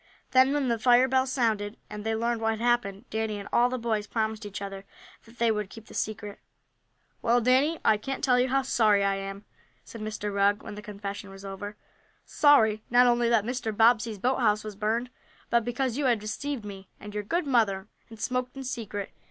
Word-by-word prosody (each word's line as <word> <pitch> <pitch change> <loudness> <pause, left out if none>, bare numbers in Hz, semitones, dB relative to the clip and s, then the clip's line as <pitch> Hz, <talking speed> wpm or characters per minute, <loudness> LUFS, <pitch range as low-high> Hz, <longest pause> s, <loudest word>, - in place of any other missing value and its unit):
Then, 260 +1 +5
when 285 -2 0
the 235 -2 0
fire 245 +2 +5
bells 260 0 +1
sounded, 220 -5 0
and 210 -1 -7
they 225 0 -1
learned 230 +1 -1
what 225 - +1
had - - -11
happened, 240 -3 0
Danny 220 -1 -2
and 200 0 -7
all 240 +1 +4
the 255 - -2
boys 220 -3 -2
promised 220 -1 -2
each 200 - -6
other 195 -1 -6 0.4
that 230 +1 -18
they 230 -1 +3
would 210 -2 -2
keep 225 +1 -12
the - - -14
secret. 210 -1 -4 0.8
"Well, 240 +1 +3
Danny, 260 +7 +3
I 215 - +5
can't 270 +6 -5
tell 250 -2 +4
you 255 +1 +2
how 270 +1 +2
sorry 215 -6 +3
I 200 0 +2
am," 195 +1 -7 0.4
said 230 - -10
Mr. 210 -1 -4
Rugg, 200 +1 +2
when - - -7
the 210 - -8
confession 200 -2 -7
was 195 0 -11
over. 205 +2 -7 0.5
"Sorry 220 -8 +4
not 245 +1 +6
only 240 -1 +3
that 225 -3 +3
Mr. 245 -2 -2
Bobbsey's 225 -1 +4
boathouse 220 -2 +1
was 215 -1 -7
burned, 225 +4 -1 0.4
but 235 -1 +3
because 245 +1 -2
you 290 - 0
have 245 -3 +3
deceived 215 +4 -4
me, 195 -2 -9
and 210 0 -9
your 210 - -2
good 335 - -1
mother, 215 -7 +1 0.2
and 225 -1 -12
smoked 250 +2 -2
in 270 - -5
secret. 220 -6 -5
225 Hz, 210 wpm, -27 LUFS, 210-245 Hz, 0.8 s, not